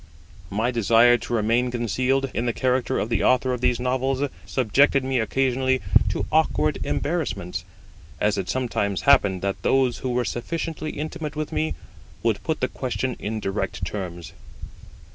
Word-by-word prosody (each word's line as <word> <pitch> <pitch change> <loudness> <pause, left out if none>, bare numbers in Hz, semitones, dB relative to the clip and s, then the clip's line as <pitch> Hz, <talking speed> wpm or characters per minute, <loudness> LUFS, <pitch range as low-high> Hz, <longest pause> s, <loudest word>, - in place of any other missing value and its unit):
My 110 +5 0
desire 115 +1 +5
to - - -6
remain 115 +3 +2
concealed, 125 +3 0
in 120 - -1
the 120 - +1
character 130 +1 0
of 110 - -1
the 115 -3 +1
Author 130 0 +3
of 125 - -4
these 125 -1 +2
Novels, 130 +2 0 0.2
subjected 135 +3 +3
me 130 -1 0
occasionally 130 +3 +1 0.3
to - - -2
awkward - - +2
embarrassments, 100 - -2 0.6
as 105 0 +2
it 95 -2 -3
sometimes 105 -6 -1
happened 100 -10 +4
that 100 0 -2
those 130 -2 +2
who 130 - -3
were 125 0 0
sufficiently 155 +4 -3
intimate 155 0 -5
with 155 0 -3
me 80 0 -1 0.5
would 110 -3 +1
put 160 -1 -2
the 130 - +2
question 130 0 -3
in 110 +1 -3
direct 95 -3 -3
terms. 90 -3 -6
125 Hz, 155 wpm, -24 LUFS, 105-130 Hz, 0.6 s, desire